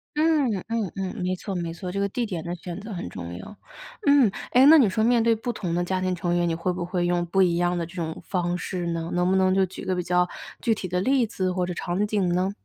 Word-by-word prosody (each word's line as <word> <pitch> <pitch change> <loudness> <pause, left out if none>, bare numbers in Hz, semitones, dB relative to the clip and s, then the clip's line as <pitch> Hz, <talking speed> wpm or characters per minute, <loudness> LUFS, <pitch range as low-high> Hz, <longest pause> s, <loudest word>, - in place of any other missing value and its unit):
嗯， 305 -4 +3 0.2
嗯 225 -5 -2
嗯， 190 -1 -3
没 180 +1 0
错 195 +1 -5
没 170 -2 -3
错， 180 +2 -6
这 195 - -4
个 200 0 0
地 240 +4 -2
点 180 -7 -4
的 170 +1 -4
选 175 0 -7
择 215 +2 -8
很 180 - -5
重 85 -1 -7
要， 145 - -10 0.5
嗯， 285 -6 +6 0.2
哎， 255 +2 +6
那 315 +3 +9
你 245 -9 +5
说 220 - -1
面 235 -1 +4
对 230 0 +4
不 225 +2 -3
同 180 -6 -3
的 175 +1 +1
家 185 +1 -1
庭 185 0 0
成 175 0 -1
员， 175 0 +2
你 - - 0
会 170 +2 -1
不 180 0 -4
会 175 0 -1
用 175 0 +1
不 190 +3 +2
一 175 -2 +3
样 175 +1 +1
的 170 - -2
这 170 +2 -14
种 160 -3 -4
方 175 -2 -1
式 180 -1 -4
呢？ 165 -1 -3
能 180 +1 +2
不 190 - +3
能 185 0 +3
就 190 0 +4
举 185 - -9
个 185 -1 0
比 180 - -2
较 180 0 +2 0.3
具 230 -3 +2
体 200 - -6
的 180 +1 0
例 255 +5 +2
子 190 -4 -2
或 180 0 0
者 180 - -4
场 175 +4 -1
景 205 -3 0
呢？ 180 +2 +1
185 Hz, 300 characters per minute, -25 LUFS, 175-210 Hz, 0.5 s, 那